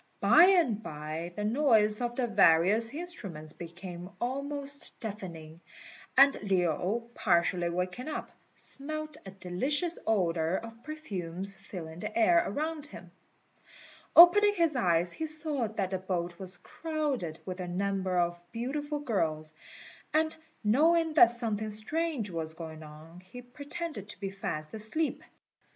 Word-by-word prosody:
By 345 - +7
and 335 - +3
by 155 0 -6
the 210 - -3
noise 220 -3 +3
of 240 0 -2
the 255 - 0
various 210 +1 +5
instruments 205 - -6
became 175 +1 -9
almost 280 +3 -1
deafening, 170 -7 -8 0.6
and 275 +1 +8
Lin, 190 +3 0
partially 175 -1 +1
waking 180 - -3
up, 310 - -5 0.2
smelt 310 +1 -3
a - - -5
delicious 260 - -1
odour 175 -5 +1
of 230 +3 -7
perfumes 195 - -4
filling 165 -4 -9
the 215 +3 -5
air 340 +10 +5
around 305 0 -3
him. - - -12 1.0
Opening 410 +5 +8
his 335 -5 +2
eyes, 175 -6 +1
he 320 - -4
saw 305 -5 0
that 200 -3 -3
the 190 - -1
boat 175 -2 -3
was 185 -2 0
crowded 285 - -3
with 185 0 -6
a 180 - -4
number 190 0 -1
of 175 0 0
beautiful 290 +5 -3
girls; 155 - -1 0.6
and 315 0 +2 0.3
knowing 320 +9 +3
that 290 -6 +8
something 220 -3 -1
strange 235 - -2
was 160 -1 -4
going 160 -1 -8
on, 155 +3 -12
he 185 +7 -12
pretended 285 - -6
to - - -10
be 195 -1 -4
fast 155 -6 -5
asleep. 220 +9 -1
210 Hz, 135 wpm, -30 LUFS, 175-290 Hz, 1.0 s, and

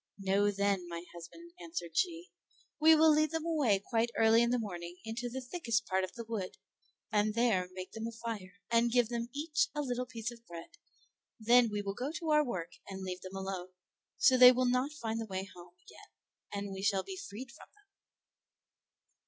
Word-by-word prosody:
"Know, 200 +1 +2
then, 200 -2 0
my 170 0 -6
husband," 175 - -11
answered 325 - -6
she, 345 - -1 0.5
"we 320 +1 +7
will 315 0 +6
lead 305 0 +3
them 325 +1 -3
away 290 -11 +2
quite 230 0 +1
early 225 +1 +5
in 235 - +3
the 250 - +2
morning 175 -6 -6
into 235 +2 -4
the 260 +2 -5
thickest 240 -5 -1
part 190 0 0
of 185 - -5
the 235 - -5
wood, 220 -5 -5 0.5
and 210 0 +1
there 215 -7 +2
make 185 0 -7
them 225 0 -5
a - - -5
fire, 225 -5 -6 0.2
and 235 0 +3
give 240 -2 +3
them 235 -1 -3
each 305 - 0
a 295 - 0
little 250 -1 -2
piece 230 -1 -5
of 235 -1 -14
bread; 170 -1 -9 0.7
then 235 +1 +5
we 205 0 -2
will 200 0 -3
go 255 +7 -3
to 330 -2 -2
our 300 0 +5
work 180 - -4 0.2
and 190 -1 -7
leave 185 -1 -5
them 190 +1 -9
alone, 190 -1 -5 0.4
so 260 - +5
they 250 0 +11
will 255 0 +1
not 250 +3 +1
find 225 -6 -3
the 225 - -5
way 190 -1 -3
home 175 0 -14
again 415 - -15 0.4
and 200 -1 -4
we 190 - -6
shall 195 -1 +1
be 385 - -7
freed 260 - -8
from - - -15
them." 415 0 -27
230 Hz, 200 wpm, -32 LUFS, 195-255 Hz, 0.7 s, they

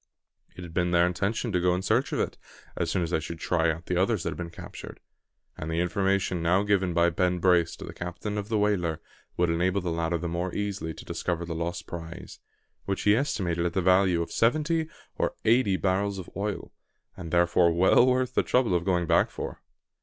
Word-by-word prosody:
It 90 - -8
had 85 -2 -9
been 90 0 +1
their 85 0 +4
intention 100 +6 -1
to 90 -2 +1
go 90 0 +3
in 90 - -3
search - - +1
of - - -1
it, - - -1 0.4
as - - -1
soon 90 - 0
as 85 - -3
they 80 - +2
should 80 +1 -7
try 80 -1 +1
out 80 +2 -3
the 90 - -1
others 100 -1 +1
that - - -1
had - - -7
been 85 -1 -5
captured; 85 - -10 0.6
and 75 - -4
the 80 +1 -1
information 95 0 0
now 90 +4 +3
given 95 -4 +1
by 85 0 +4
Ben 90 +1 +1
Brace 85 -2 +3
to - - -9
the - - -8
captain 90 +4 -5
of 105 0 -4
the 110 - +1
whaler 90 -6 +1 0.4
would 85 -1 +2
enable 90 +4 +1
the 90 -2 -3
latter 85 +1 0
the 85 +1 -4
more 85 +2 -3
easily 95 -6 -3
to - - -11
discover 85 -1 -2
the 85 - -4
lost 85 +1 -4
prize, 85 0 -8 0.5
which 100 -1 -2
he 105 0 +5
estimated 90 - -1
at 85 -1 -1
the 95 - +1
value 90 -2 +4
of - - -10
seventy 155 +6 +1 0.3
or - - 0
eighty 110 -4 +3
barrels 100 +2 0
of 95 - -8
oil, 100 0 -3 0.4
and 90 -4 -7
therefore 85 0 +3
well 90 +7 +5
worth 130 0 +1
the - - +3
trouble 125 -6 +2
of 85 -1 +1
going 90 -2 +1
back - - +3
for. - - -7
90 Hz, 220 wpm, -27 LUFS, 85-100 Hz, 0.6 s, he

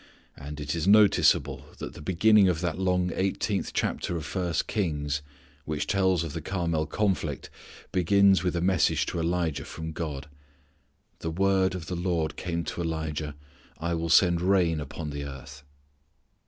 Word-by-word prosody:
And 75 +2 -8
it 75 0 -3
is 85 +1 -2
notable 105 0 +4
that - - -7
the - - -11
beginning 95 +4 +4
of 85 -3 0
that 90 0 -2
long 90 -1 +1
eighteenth 95 +1 -1
chapter 85 - -1
of 80 - -6
first 90 -2 -1
Kings 75 -8 -1 0.4
which 75 -1 -2
tells 95 -4 +2
of 80 - -5
the 85 - -4
Carmel 85 -3 -1
conflict 90 -6 -1 0.4
begins 95 0 +4
with 90 -1 -1
a 85 - 0
message 90 -3 +2
to - - -3
Elijah 85 -2 -1
from 80 0 -6
God: 75 -3 -5 0.9
"The 80 - -3
word 95 +2 +2
of 90 -3 -6
the 90 - -4
Lord 85 -3 -1
came 85 -1 -3
to 85 - -4
Elijah:... 80 -2 -3 0.4
I 85 +1 -2
will 85 0 -2
send 85 0 +5
rain 90 -4 +2
upon 75 +1 -6
the 70 0 -5
earth." 70 0 -9
85 Hz, 160 wpm, -27 LUFS, 80-95 Hz, 0.9 s, send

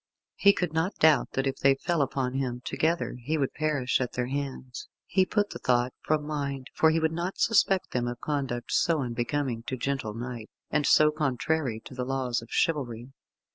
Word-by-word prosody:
He 200 - +7
could 180 -5 -2
not 160 +5 0
doubt 155 -4 +4
that 135 - 0
if 135 - -1
they 135 0 +4
fell 170 +3 0
upon 135 -2 -1
him 125 -2 -2
together 165 -5 0
he 155 +7 -1
would 135 -3 -1
perish 140 -5 0
at 125 - -2
their 125 - -1
hands. 130 -1 -5 0.2
He 190 -1 +2
put 205 +1 0
the - - -6
thought 125 0 +1
from 150 -1 0
mind, 140 -3 -4
for 160 - +4
he 160 +1 +2
would 160 0 +1
not 170 +3 -3
suspect 195 -4 +3
them 120 -1 -1
of 120 0 -4
conduct 135 -6 -3
so 160 -4 +2
unbecoming 120 +1 -2
to 130 - -2
gentle 125 -4 -2
knight, 120 -1 -6 0.2
and 150 -1 +1
so 155 0 +6
contrary 140 -3 -1
to - - -10
the 125 0 -3
laws 125 -2 -1
of 115 - -13
chivalry. 125 -6 -1
135 Hz, 195 wpm, -28 LUFS, 125-155 Hz, 0.2 s, He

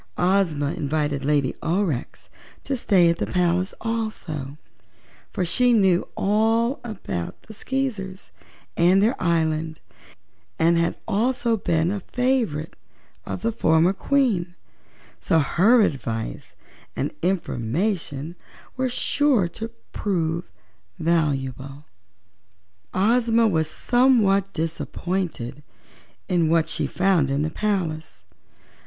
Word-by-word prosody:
Ozma 175 -6 +1
invited 145 -2 -1
Lady 145 -2 +1
Aurex 165 -6 -2 0.4
to 275 - -2
stay 195 -8 +3
at 170 - 0
the - - -1
palace 180 +1 0
also, 180 -11 -4 0.7
for 185 - -2
she 245 +8 +3
knew 190 -5 +3
all 225 +5 +2
about 190 - -5
the 220 - -12
Skeezers 210 -6 -4 0.4
and 185 +3 +4
their 230 +4 +2
island 160 -2 0 0.8
and 170 +1 +3
had 170 0 0
also 235 +2 +1
been 170 -4 0
a 205 - -2
favorite 235 - -1 0.5
of - - -5
the 230 - +1
former 165 -3 +3
Queen, 200 -7 0 0.6
so 165 - +1
her 195 - +4
advice 115 - -3 0.4
and - - -2
information 165 - -2 0.4
were 260 0 0
sure 250 -4 +2
to 225 +6 -6 0.2
prove 170 -3 -2 0.5
valuable. 140 -4 -1 1.1
Ozma 230 +3 +3
was 160 -6 0
somewhat 215 -4 +3
disappointed 165 -4 -3 0.7
in 170 -3 +2
what 165 -1 +3
she - - -2
found 180 -7 +2
in 140 +2 0
the 155 - -2
palace. 175 -6 -2
180 Hz, 105 wpm, -23 LUFS, 155-215 Hz, 1.1 s, and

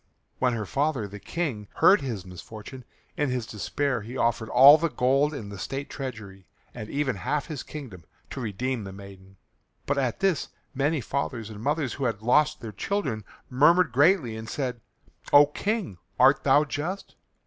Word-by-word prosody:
When 125 -1 +2
her 110 -2 -3
father, 140 -1 -1
the 100 +1 -10
King, 130 - -4
heard 200 - +5
his 115 -9 -4
misfortune, 110 +8 -10 0.3
in 145 -2 0
his 125 -2 -2
despair 120 +4 -2
he 120 +5 -7
offered 115 -2 0
all 140 +5 +8
the 165 +1 0
gold 135 +2 +2
in 115 -9 -7
the 100 -1 -8
state 135 +6 -5
treasury 105 - -7 0.3
and 110 - -8
even 140 -6 -1
half 145 +8 -2
his 150 -5 -6
kingdom, 120 - -9 0.3
to 135 - -5
redeem 120 +2 -3
the 95 - -7
maiden. 95 -1 -13 0.5
But 145 0 0
at 130 -3 -1
this 190 -5 +1 0.2
many 145 +2 0
fathers 120 -5 -3
and 105 -1 -9
mothers 145 0 -1
who 140 - -3
had 110 -3 -2
lost 150 +5 +3
their 115 -3 -6
children 110 - -2 0.2
murmured 160 +5 +4
greatly 140 - +3
and 110 +1 -7
said, 125 -4 -3 0.5
"O 145 0 +9
King, 190 - -3 0.2
art 135 +2 +5
thou 145 +2 +5
just? 155 +7 -5
130 Hz, 170 wpm, -26 LUFS, 110-145 Hz, 0.5 s, O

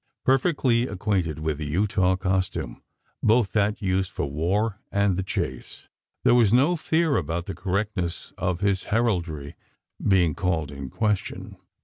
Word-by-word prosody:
Perfectly 130 -3 +2
acquainted 90 -5 -1
with 80 -1 -2
the 75 - -3
Utah 95 +3 +2
costume 95 -10 -2 0.4
both 110 -1 +3
that 105 0 0
used 95 0 +1
for 105 - -3
war 95 +9 -1
and 100 -2 +2
the 95 - -1
chase 95 - -5 0.3
there - - +5
was 115 -5 +5
no 140 +9 +4
fear 160 -2 +1
about 85 +1 -2
the 95 - -4
correctness 95 -2 -3
of 90 0 -2
his 100 -2 +1
heraldry 85 -11 -1 0.5
being 90 -5 +3
called 80 -6 -1
in 70 -2 -7
question. 105 - -2
95 Hz, 140 wpm, -25 LUFS, 85-110 Hz, 0.5 s, there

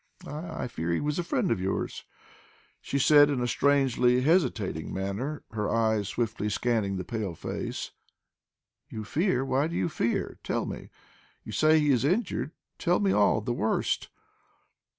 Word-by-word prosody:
"I 160 +3 -5
I - - -2
fear 85 -8 -3
he 85 - +1
was 150 +2 -1
a - - 0
friend 205 +1 0
of 90 - 0
yours," 95 +1 -3 0.8
she 140 - -2
said 145 +1 +6
in 140 -3 0
a 120 - 0
strangely 125 -2 +3
hesitating 130 - +1
manner, 100 +11 -3
her 105 -2 -2
eyes 110 -3 +1
swiftly 110 -1 -2
scanning 105 -3 0
the 90 - -3
pale 100 -3 -4
face. - - -5 1.0
"You 110 - -6
fear! 140 - 0
Why 135 +3 +1
do 170 - -5
you - - 0
fear? 115 -6 -2
Tell - - -1
me. - - -7 0.5
You - - -8
say 155 0 +4
he 150 -1 +3
is 125 -4 +2
injured. 185 - 0 0.3
Tell 175 +1 +2
me 200 -2 +2
all 105 - +3
the 120 +3 -2
worst!" 110 -2 0
125 Hz, 165 wpm, -28 LUFS, 105-150 Hz, 1.0 s, said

